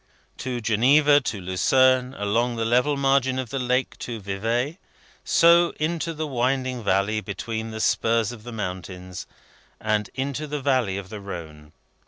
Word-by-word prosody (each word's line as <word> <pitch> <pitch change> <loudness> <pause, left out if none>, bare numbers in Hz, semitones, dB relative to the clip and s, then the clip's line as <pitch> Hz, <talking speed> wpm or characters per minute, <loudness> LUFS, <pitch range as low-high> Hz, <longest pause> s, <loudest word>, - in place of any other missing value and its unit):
To 125 -2 -3
Geneva, 140 +7 +4
to 110 -5 -3
Lausanne, 130 +8 +2
along 115 +4 0
the 115 0 -1
level 125 +5 +2
margin 135 -1 +2
of 130 -3 -4
the 135 - -2
lake 125 +1 -1
to 115 -2 -5
Vevay, 115 - -2 0.4
so 170 0 +5
into 165 +1 -1
the 155 +1 -3
winding 130 -2 -1
valley 100 +2 +1
between 110 +3 -5
the 110 0 -6
spurs 115 +1 +1
of 120 -3 -10
the 120 +2 -9
mountains, 90 -3 -6 0.5
and 105 -1 0
into 140 +3 -3
the 150 0 -3
valley 130 -8 +1
of 100 -1 -7
the 105 -1 -7
Rhone. 80 -6 -9
120 Hz, 155 wpm, -24 LUFS, 105-135 Hz, 0.5 s, so